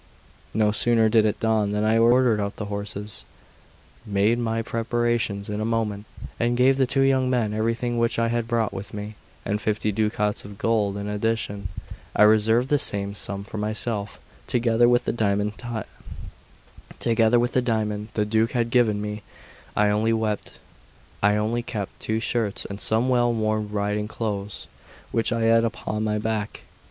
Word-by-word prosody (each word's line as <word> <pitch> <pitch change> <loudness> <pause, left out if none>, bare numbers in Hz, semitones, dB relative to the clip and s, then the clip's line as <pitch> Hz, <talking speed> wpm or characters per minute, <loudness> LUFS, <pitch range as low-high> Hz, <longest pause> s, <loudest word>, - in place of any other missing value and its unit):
No 105 -1 +3
sooner 115 0 +3
did 110 -1 +4
it 105 - 0
dawn 110 -2 +1
than 105 0 0
I 110 +1 +3
ordered 120 -1 +4
out 100 -1 -2
the 105 - -5
horses, 100 0 -6 0.8
made 105 +2 +1
my 115 -1 -1
preparations 115 -3 -1
in 105 0 -3
a - - -1
moment, 110 -2 -1 0.3
and 120 +1 +1
gave 130 +2 +4
the 135 -2 +2
two 135 +2 +1
young 130 -1 +2
men 115 -5 0
everything 115 +2 -1
which 115 0 +1
I 115 0 +1
had 120 -1 -1
brought 115 -2 0
with 100 +2 -7
me, 105 +1 -6 0.3
and 105 +1 -1
fifty 105 0 0
ducats 105 0 -1
of 100 -1 -10
gold 105 -3 +1
in 100 0 -4
addition. 105 -2 -2 0.5
I - - +6
reserved 110 +4 +4
the 145 - +3
same 100 -4 +2
sum 100 -1 -3
for 105 +1 -6
myself, 105 -1 -2 0.3
together 120 0 +3
with 120 0 +3
the - - +1
diamond 105 -2 0 2.6
the 105 - +1
Duke 110 +1 +2
had 120 -1 0
given 110 -4 +3
me; 105 0 -5 0.6
I 105 0 +4
only 110 +2 +2 1.4
kept 110 -5 -6
two 110 0 -1
shirts 115 -3 -1
and 100 0 -7
some 115 +3 +2
well 120 -2 +3
worn 110 -2 -1
riding 105 0 -1
clothes 105 -3 -4 0.5
which 115 - 0
I 115 0 0
had 115 0 +4
upon 110 -1 -2
my 105 -1 0
back. 105 -1 -3
110 Hz, 155 wpm, -24 LUFS, 105-115 Hz, 2.6 s, I